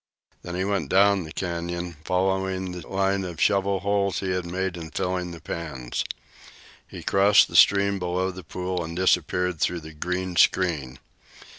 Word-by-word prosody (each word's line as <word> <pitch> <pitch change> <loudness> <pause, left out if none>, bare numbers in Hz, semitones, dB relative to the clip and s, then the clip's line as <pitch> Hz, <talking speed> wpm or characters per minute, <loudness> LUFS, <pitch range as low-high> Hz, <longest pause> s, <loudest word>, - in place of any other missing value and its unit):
Then 90 - -6
he 95 +1 -1
went 100 -8 -1
down 100 -1 +4
the 80 - -10
canyon, 85 0 -4
following 95 0 0
the 90 -2 -8
line 95 0 0
of 85 -3 -6
shovel 100 -1 +2
holes 100 -2 0
he 95 -1 -2
had 90 -1 -2
made 95 +1 -2
in 80 -2 -7
filling 90 +1 -2
the 85 -1 -9
pans. 65 -9 -4 0.8
He - - -9
crossed 100 +1 +5
the - - -10
stream 100 0 +5
below 90 +1 -1
the 95 0 -10
pool 90 +2 -3
and 85 +1 -6
disappeared 90 -1 +1
through 85 +1 0
the 80 0 -10
green 90 +3 -3
screen. 75 -9 +2
90 Hz, 165 wpm, -25 LUFS, 85-95 Hz, 0.8 s, crossed